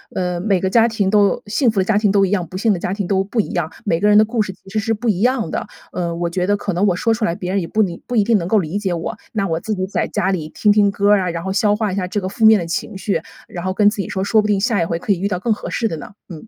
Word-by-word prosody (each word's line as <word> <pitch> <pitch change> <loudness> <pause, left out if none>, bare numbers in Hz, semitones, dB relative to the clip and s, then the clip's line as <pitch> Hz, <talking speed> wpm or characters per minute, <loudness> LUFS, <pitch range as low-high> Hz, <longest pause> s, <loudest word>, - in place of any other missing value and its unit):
呃， 180 -1 -1
每 190 -1 +1
个 190 - 0
家 230 +3 +4
庭 215 -4 0
都 205 -1 +3
幸 240 +4 +2
福 210 -3 +1
的 - - +2
家 205 +2 +1
庭 210 -1 +2
都 195 0 +3
一 - - -2
样， 180 -4 -1
不 185 - -7
幸 220 +3 +2
的 190 - 0
家 180 - -2
庭 200 -1 -3
都 190 0 +2
不 220 +3 0
一 - - -7
样， 170 -3 -2
每 165 - 0
个 205 - +2
人 210 0 +6
的 215 - +7
故 225 +1 -1
事 190 -3 -3
其 190 - -18
实 215 +2 -1
是 225 +2 0
不 225 +2 -2
一 190 -4 +1
样 245 +1 +1
的。 - - -3 0.2
呃， 170 -2 -3
我 170 0 -2
觉 180 +2 -1
得 205 - +3
可 205 0 -3
能 185 +3 +1
我 185 - +2
说 230 +5 +1
出 225 0 -1
来， 170 - -1
别 180 0 -4
人 200 - +1
也 170 - -4
不 220 - +1
理 175 -5 -2
不 245 - -3
一 215 - +4
定 225 0 +3
能 170 -2 -3
够 220 - +3
理 180 +3 -3
解 190 -3 -1
我， 170 +6 -4 0.2
那 215 -3 0
我 160 - -1
自 215 +4 -3
己 185 -1 -2
在 195 - -2
家 190 - -1
里 160 -5 -2
听 210 - +2
听 205 -1 +4
歌 200 +1 +1
儿 205 - +5
啊， 180 - -1
然 165 0 -4
后 190 - -3
消 205 +1 +2
化 215 -2 -1
一 - - -3
下 185 - -1
这 205 +3 -2
个 185 - -3
负 220 +3 0
面 220 0 +8
的 175 - -3
情 170 +3 -4
绪， 200 +1 -1 0.3
然 175 0 -6
后 185 - -1
跟 205 +1 +4
自 210 - -6
己 - - -5
说， 190 0 -2
说 215 +2 +3
不 210 - -2
定 205 -2 +2
下 210 -2 +1
一 165 - +1
回 165 0 -2
可 205 - -2
以 180 - -5
遇 195 - 0
到 185 -3 -2
更 220 +4 +1
合 - - -7
适 230 - -1
的 165 - -4
呢， 150 - -10 0.2
嗯。 170 +5 -10
200 Hz, 385 characters per minute, -19 LUFS, 180-215 Hz, 0.3 s, 面